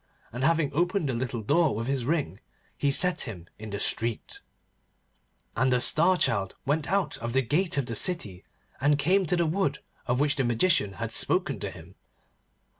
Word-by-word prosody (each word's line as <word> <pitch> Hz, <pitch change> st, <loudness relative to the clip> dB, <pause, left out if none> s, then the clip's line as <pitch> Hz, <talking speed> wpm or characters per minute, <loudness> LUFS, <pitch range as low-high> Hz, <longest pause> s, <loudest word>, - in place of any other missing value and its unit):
And 125 Hz, +2 st, -4 dB
having 160 Hz, -2 st, +2 dB
opened 175 Hz, 0 st, 0 dB
the -, -, 0 dB
little 120 Hz, -1 st, -3 dB
door 150 Hz, +3 st, +2 dB
with 115 Hz, +2 st, -3 dB
his 135 Hz, -2 st, -1 dB
ring 145 Hz, -, -1 dB, 0.4 s
he 145 Hz, -, 0 dB
set 175 Hz, +5 st, +2 dB
him 90 Hz, -6 st, -9 dB
in 110 Hz, 0 st, -8 dB
the 100 Hz, 0 st, -4 dB
street. 115 Hz, +1 st, -2 dB, 1.1 s
And 130 Hz, -1 st, +2 dB
the 125 Hz, -, +3 dB
Star 170 Hz, +8 st, +4 dB
Child 100 Hz, -, 0 dB
went 150 Hz, +4 st, -1 dB
out 190 Hz, -7 st, 0 dB
of 115 Hz, 0 st, -4 dB
the 135 Hz, 0 st, +2 dB
gate 165 Hz, +7 st, 0 dB
of 140 Hz, -, +1 dB
the 115 Hz, -, -4 dB
city, 105 Hz, -, 0 dB, 0.4 s
and 145 Hz, +2 st, +3 dB
came 185 Hz, +6 st, +2 dB
to 180 Hz, -, +2 dB
the 170 Hz, -1 st, +1 dB
wood 155 Hz, -4 st, 0 dB, 0.3 s
of 125 Hz, +1 st, +1 dB
which 145 Hz, 0 st, +1 dB
the 135 Hz, -, +1 dB
Magician 120 Hz, -, +2 dB
had 115 Hz, +2 st, -5 dB
spoken 140 Hz, -, +1 dB
to 100 Hz, -, -4 dB
him. 90 Hz, -1 st, -13 dB
140 Hz, 190 wpm, -27 LUFS, 115-165 Hz, 1.1 s, Star